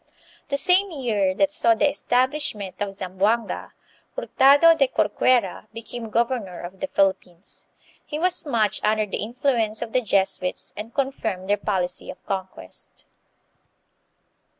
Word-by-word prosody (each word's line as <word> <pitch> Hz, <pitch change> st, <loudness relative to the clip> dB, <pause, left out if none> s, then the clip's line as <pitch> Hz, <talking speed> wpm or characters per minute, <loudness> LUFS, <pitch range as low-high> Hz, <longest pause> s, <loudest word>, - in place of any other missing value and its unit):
The 280 Hz, -, 0 dB
same 370 Hz, +6 st, +4 dB
year 220 Hz, -, 0 dB
that 295 Hz, +7 st, +2 dB
saw 230 Hz, -6 st, +3 dB
the 295 Hz, -, +3 dB
establishment 255 Hz, -7 st, -1 dB
of 200 Hz, -1 st, -2 dB
Zam 185 Hz, -1 st, -8 dB
boanga, 225 Hz, +4 st, 0 dB, 0.4 s
Hurtado 290 Hz, -, +5 dB
de 275 Hz, -4 st, +3 dB
Corcuera 215 Hz, -2 st, +1 dB
became 230 Hz, 0 st, -7 dB
governor 230 Hz, -5 st, -1 dB
of 185 Hz, +2 st, -9 dB
the -, -, -3 dB
Philippines. 190 Hz, -5 st, -2 dB, 0.4 s
He 300 Hz, -, -5 dB
was 360 Hz, +2 st, +1 dB
much 230 Hz, -, 0 dB
under 215 Hz, 0 st, +2 dB
the 200 Hz, -, -4 dB
influence 230 Hz, -1 st, -1 dB
of 225 Hz, -, -9 dB
the 255 Hz, -, +3 dB
Jesuits 195 Hz, -4 st, 0 dB
and 215 Hz, +2 st, -7 dB
confirmed 230 Hz, -9 st, -3 dB
their 205 Hz, -, +3 dB
policy 185 Hz, -3 st, -2 dB
of 185 Hz, -, -10 dB
conquest. 190 Hz, -, -6 dB
220 Hz, 135 wpm, -23 LUFS, 195-270 Hz, 0.4 s, Hurtado